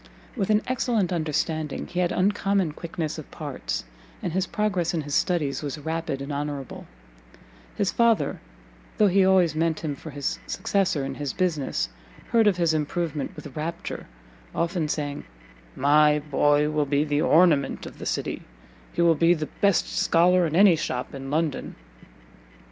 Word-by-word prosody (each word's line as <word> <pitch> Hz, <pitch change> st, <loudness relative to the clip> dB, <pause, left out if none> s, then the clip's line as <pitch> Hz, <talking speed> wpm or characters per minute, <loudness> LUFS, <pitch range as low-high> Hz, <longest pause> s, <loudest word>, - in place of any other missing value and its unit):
With 200 Hz, -5 st, -1 dB
an 215 Hz, 0 st, +3 dB
excellent 235 Hz, -7 st, 0 dB
understanding 155 Hz, -2 st, -2 dB
he 175 Hz, -, -4 dB
had 175 Hz, -1 st, +1 dB
uncommon 195 Hz, -2 st, +1 dB
quickness 165 Hz, 0 st, -5 dB
of -, -, -10 dB
parts, -, -, -4 dB, 0.4 s
and 175 Hz, -, -2 dB
his 190 Hz, +1 st, 0 dB
progress 185 Hz, -5 st, 0 dB
in 160 Hz, -, 0 dB
his 145 Hz, -1 st, -6 dB
studies 150 Hz, -7 st, +1 dB
was 145 Hz, -2 st, -4 dB
rapid 160 Hz, -2 st, -3 dB
and 140 Hz, +1 st, -5 dB
honourable: 145 Hz, -1 st, -5 dB, 0.9 s
his 195 Hz, -, 0 dB
father, 235 Hz, -2 st, +2 dB, 0.6 s
though 215 Hz, -, +5 dB
he 195 Hz, 0 st, +4 dB
always 185 Hz, -4 st, +4 dB
meant 160 Hz, 0 st, 0 dB
him 155 Hz, -3 st, -2 dB
for 155 Hz, -, -10 dB
his 140 Hz, -1 st, -3 dB
successor 185 Hz, -8 st, 0 dB
in 135 Hz, -, -4 dB
his 145 Hz, 0 st, -4 dB
business, 150 Hz, -, -1 dB, 0.4 s
heard 225 Hz, -2 st, +4 dB
of 195 Hz, -4 st, +3 dB
his 170 Hz, -2 st, +2 dB
improvement 155 Hz, -1 st, -2 dB
with 145 Hz, -4 st, -10 dB
rapture, 165 Hz, +2 st, -5 dB, 0.5 s
often 170 Hz, -1 st, 0 dB
saying, 145 Hz, -1 st, -3 dB, 0.5 s
"My 150 Hz, +2 st, +4 dB
boy 145 Hz, 0 st, +2 dB
will 150 Hz, -1 st, 0 dB
be 140 Hz, +1 st, +2 dB
the 145 Hz, -1 st, 0 dB
ornament 155 Hz, -4 st, +3 dB
of -, -, -10 dB
the -, -, -5 dB
city, -, -, -2 dB, 0.5 s
he 170 Hz, -, +1 dB
will 170 Hz, -1 st, +6 dB
be 165 Hz, +3 st, +4 dB
the 155 Hz, -2 st, -4 dB
best 200 Hz, -2 st, +3 dB
scholar 175 Hz, +1 st, +4 dB
in 155 Hz, -, -3 dB
any 195 Hz, -1 st, +7 dB
shop 125 Hz, -5 st, -3 dB
in 135 Hz, -1 st, -7 dB
London." 155 Hz, 0 st, -1 dB
160 Hz, 160 wpm, -25 LUFS, 145-180 Hz, 0.9 s, any